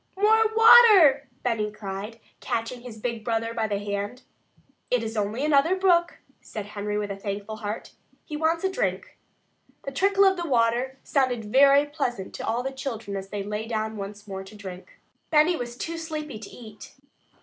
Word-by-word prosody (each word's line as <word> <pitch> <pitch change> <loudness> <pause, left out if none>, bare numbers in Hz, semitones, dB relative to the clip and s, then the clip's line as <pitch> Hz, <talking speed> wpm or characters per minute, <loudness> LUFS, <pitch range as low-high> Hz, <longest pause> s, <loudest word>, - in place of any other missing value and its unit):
"More 440 +2 +4
water!" 420 - +7 0.2
Benny 220 -4 -1
cried, 210 +2 -7 0.2
catching 230 +2 -3
his 240 -3 -10
big 230 0 -4
brother 230 0 -1
by 225 -1 -1
the 205 -1 -1
hand. 205 +4 -4 0.7
"It 250 -2 +1
is 225 0 -5
only 215 +6 -1
another 305 +4 +3
brook," 350 -3 +2 0.2
said 210 -2 -7
Henry 210 0 -4
with 205 -1 -3
a - - -4
thankful 200 +2 -5
heart. 215 0 -5 0.3
"He 300 - -6
wants 320 +3 0
a 380 - +1
drink." - - -3 0.6
The 275 - -5
trickle 395 +7 +3
of 380 -3 +2
water 250 -2 +1
sounded 255 -5 0
very 275 +5 +5
pleasant 250 -9 -4
to - - -6
all 235 +2 0
the 270 - -3
children 235 -7 -5
as 195 0 -6
they 205 -1 -4
lay 210 +2 -4
down 220 -1 -2
once 205 +1 -8
more 190 -1 -6
to 195 +3 -13
drink. 190 -3 -10 0.3
Benny 310 +3 +4
was 240 -4 -6
too 330 +4 -4
sleepy 305 -6 -6
to 215 - -10
eat. 215 -3 -12
235 Hz, 175 wpm, -25 LUFS, 210-300 Hz, 0.7 s, water